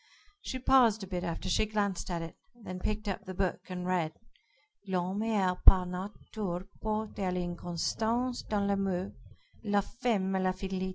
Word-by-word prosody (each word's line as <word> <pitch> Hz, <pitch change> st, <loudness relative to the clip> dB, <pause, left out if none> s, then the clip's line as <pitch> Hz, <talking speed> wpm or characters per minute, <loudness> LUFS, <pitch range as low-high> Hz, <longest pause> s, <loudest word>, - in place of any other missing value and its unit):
She 260 Hz, -, -3 dB
paused 245 Hz, -5 st, +5 dB
a -, -, -6 dB
bit 180 Hz, -1 st, -3 dB
after 170 Hz, +1 st, -3 dB
she 215 Hz, +4 st, +2 dB
glanced 205 Hz, -4 st, -1 dB
at 170 Hz, -2 st, -1 dB
it, 165 Hz, -, -7 dB, 0.2 s
then 195 Hz, -6 st, -7 dB
picked 215 Hz, +3 st, -2 dB
up 195 Hz, 0 st, -2 dB
the 185 Hz, -1 st, -6 dB
book 190 Hz, -1 st, 0 dB
and 180 Hz, -1 st, -4 dB
read: 175 Hz, -4 st, +1 dB, 0.8 s
"'_L'homme 190 Hz, +4 st, 0 dB
est 190 Hz, -4 st, +1 dB
par 185 Hz, -1 st, +8 dB
Nature 185 Hz, 0 st, -4 dB, 0.2 s
porté 215 Hz, 0 st, -2 dB
à 190 Hz, -2 st, 0 dB
l'inconstance 180 Hz, +8 st, -1 dB
dans 205 Hz, -2 st, +1 dB
l'amour, 195 Hz, -2 st, 0 dB, 0.5 s
la 205 Hz, -2 st, +3 dB
femme 205 Hz, -4 st, 0 dB
à 190 Hz, -, +2 dB
la 185 Hz, 0 st, +2 dB
fidelité. 190 Hz, 0 st, -3 dB
190 Hz, 165 wpm, -31 LUFS, 180-215 Hz, 0.8 s, par